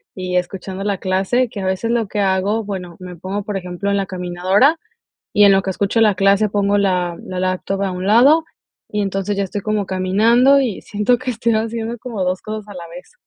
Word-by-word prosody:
y 180 -1 -2
escuchando 185 +2 -4
la 200 -2 -1
clase, 195 +7 0
que 205 -4 -6
a 190 - -3
veces 190 +4 -1
lo 235 -3 0
que 210 - -4
hago, 200 +3 +1
bueno, 185 -4 -6
me 180 -1 -9
pongo, 190 +4 -4
por 205 -1 -3
ejemplo, 180 +1 -4
en 200 - +1
la 195 - 0
caminadora, 185 - +1 0.6
y 205 - +7
en 200 - +7
lo 195 0 +4
que 190 - -2
escucho 200 +4 0
la 215 -2 +5
clase 200 +2 +3
pongo 205 0 +1
la 180 -3 0
laptop 185 +1 -3
a 195 - -1
un 180 +1 -5
lado, 275 +10 +5 0.5
y 210 - -1
entonces, 195 0 -2
ya 200 - +1
estoy 200 +2 -4
como 215 0 -1
caminando 225 +9 +4
y 235 -8 -2
siento 210 +4 +1
que 255 0 -3
estoy 230 0 0
haciendo 225 +1 -2
como 230 -6 -4
2 185 0 -1
cosas 215 -1 -6
a 205 - -9
la 170 -2 -8
vez. 175 +2 -12
200 Hz, 215 wpm, -19 LUFS, 185-215 Hz, 0.6 s, y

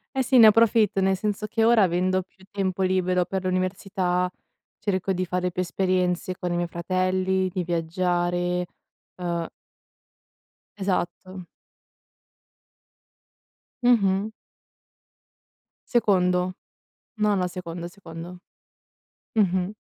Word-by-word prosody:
Eh 265 - +2
sì, 255 +1 +4
ne 225 - +10
approfitto, 215 -2 +4
nel 190 0 +3
senso 210 +2 -2
che 225 +1 0
ora, 230 -2 +5
avendo 185 +1 +1
più 190 +1 -24
tempo 190 -2 -2
libero 185 -1 +1
per 190 +1 -3
l'università, 185 0 0 0.5
cerco 190 -1 -1
di 185 0 -1
fare 180 0 -1
più 180 - -2
esperienze 185 0 0
con 180 -1 -4
i - - 0
miei 175 0 -1
fratelli, 185 +2 0
di 180 - -1
viaggiare, 175 +1 0 0.5
uhm 170 -2 -3 1.3
Esatto. 185 -1 -3 2.4
Mh-mh. 205 -4 +3 1.6
Secondo. 185 -6 +2 0.7
No, 210 -1 +3
no, 185 -2 +1
secondo, 175 -1 -6
secondo. 175 -1 -10 1.0
Mh-mh. 185 -3 +2
185 Hz, 105 wpm, -25 LUFS, 180-195 Hz, 2.4 s, ne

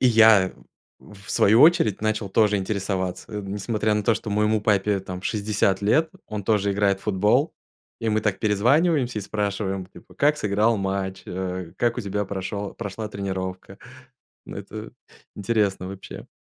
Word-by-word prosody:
и 130 - +4
я, 110 -5 +6 0.5
в 100 -1 -13
свою 110 +4 +4
очередь 160 - +5
начал 110 -1 -1
тоже 105 +1 +3
интересоваться. 95 0 -3
Несмотря 105 +2 -1
на 105 - 0
то, 115 - +3
что 105 -1 -5
моему 105 +1 +2
папе 105 -1 +1
там 95 -1 -7
60 100 -2 0
лет, 155 +10 +3 0.2
он 105 -1 -5
тоже 100 -1 +1
играет 100 -1 +1
в - - -18
футбол. 105 - +2 0.5
И 115 - -1
мы 110 0 +2
так 105 -3 -1
перезваниваемся 125 - +2
и - - -4
спрашиваем 100 -2 -2
типа - - -17
"как 150 +1 +3
сыграл 105 +1 +2
матч?" 95 -1 -3
Э, 90 -1 -4
"как 120 0 +1
у - - 0
тебя 105 -1 -2
прошел 100 +1 -5
прошла 105 0 -5
тренировка?" 95 -1 -5 0.7
Это - - -8 0.4
интересно, 100 -3 0
вообще. 95 0 -9
105 Hz, 155 wpm, -24 LUFS, 95-110 Hz, 0.7 s, я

